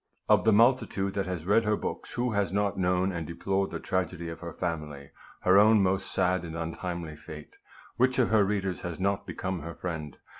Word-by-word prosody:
Of -, -, +4 dB
the 110 Hz, -, +6 dB
multitude 110 Hz, -4 st, +3 dB
that 100 Hz, -1 st, -2 dB
has 90 Hz, -3 st, -4 dB
read 105 Hz, +4 st, +4 dB
her 105 Hz, -1 st, +1 dB
books, -, -, -5 dB
who 120 Hz, 0 st, 0 dB
has 100 Hz, -4 st, 0 dB
not 100 Hz, 0 st, 0 dB
known 90 Hz, +1 st, +1 dB
and 85 Hz, -3 st, -4 dB
deplored 95 Hz, +3 st, -1 dB
the -, -, -5 dB
tragedy 90 Hz, -2 st, -2 dB
of 80 Hz, -, -7 dB
her 85 Hz, -1 st, -6 dB
family, 75 Hz, -5 st, -5 dB, 0.3 s
her 95 Hz, +2 st, +6 dB
own 105 Hz, 0 st, +6 dB
most 95 Hz, +1 st, 0 dB
sad 90 Hz, 0 st, +1 dB
and 80 Hz, -1 st, -6 dB
untimely 85 Hz, -1 st, -4 dB
fate? 75 Hz, -1 st, -11 dB, 0.4 s
Which 130 Hz, +1 st, +3 dB
of 125 Hz, -4 st, +3 dB
her 110 Hz, -2 st, +5 dB
readers 95 Hz, -2 st, -1 dB
has 90 Hz, -1 st, -5 dB
not 100 Hz, +1 st, 0 dB
become 95 Hz, -1 st, -3 dB
her 85 Hz, +1 st, -7 dB
friend 75 Hz, -6 st, -5 dB
95 Hz, 200 wpm, -28 LUFS, 85-100 Hz, 0.4 s, the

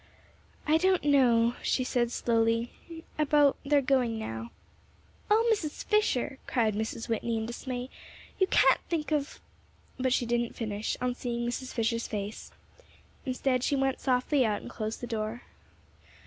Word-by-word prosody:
"I 310 Hz, +1 st, +4 dB
don't 370 Hz, +2 st, +2 dB
know," 240 Hz, -5 st, +4 dB
she 255 Hz, -, +1 dB
said 240 Hz, -1 st, 0 dB
slowly, 230 Hz, 0 st, +1 dB, 0.5 s
"about 295 Hz, -2 st, +4 dB
their 285 Hz, 0 st, +3 dB
going 250 Hz, -4 st, +2 dB
now." 115 Hz, -, -5 dB, 0.8 s
"Oh, 445 Hz, +3 st, +4 dB
Mrs. 315 Hz, -8 st, -4 dB
Fisher," 285 Hz, -, +1 dB
cried 225 Hz, -4 st, +1 dB
Mrs. 220 Hz, +2 st, -3 dB
Whitney, 230 Hz, 0 st, -1 dB
in 220 Hz, -, -2 dB
dismay, 245 Hz, +1 st, -5 dB, 0.5 s
"you 380 Hz, -, +4 dB
can't -, -, +4 dB
think 320 Hz, -2 st, -2 dB
of 295 Hz, -1 st, -1 dB, 0.3 s
" -, -, -33 dB
but 260 Hz, 0 st, +1 dB
she 245 Hz, -, +2 dB
didn't 240 Hz, 0 st, -1 dB
finish, 215 Hz, -2 st, -3 dB
on 250 Hz, 0 st, 0 dB
seeing 240 Hz, -1 st, -3 dB
Mrs. 255 Hz, +2 st, -4 dB
Fisher's 230 Hz, 0 st, -1 dB
face. 205 Hz, 0 st, -5 dB, 0.8 s
Instead, 255 Hz, 0 st, 0 dB
she 285 Hz, -, +1 dB
went 270 Hz, -1 st, 0 dB
softly 260 Hz, +2 st, +2 dB
out 210 Hz, -3 st, 0 dB
and -, -, -8 dB
closed 215 Hz, 0 st, -4 dB
the -, -, -3 dB
door. 225 Hz, 0 st, -4 dB
245 Hz, 150 wpm, -29 LUFS, 230-275 Hz, 0.8 s, I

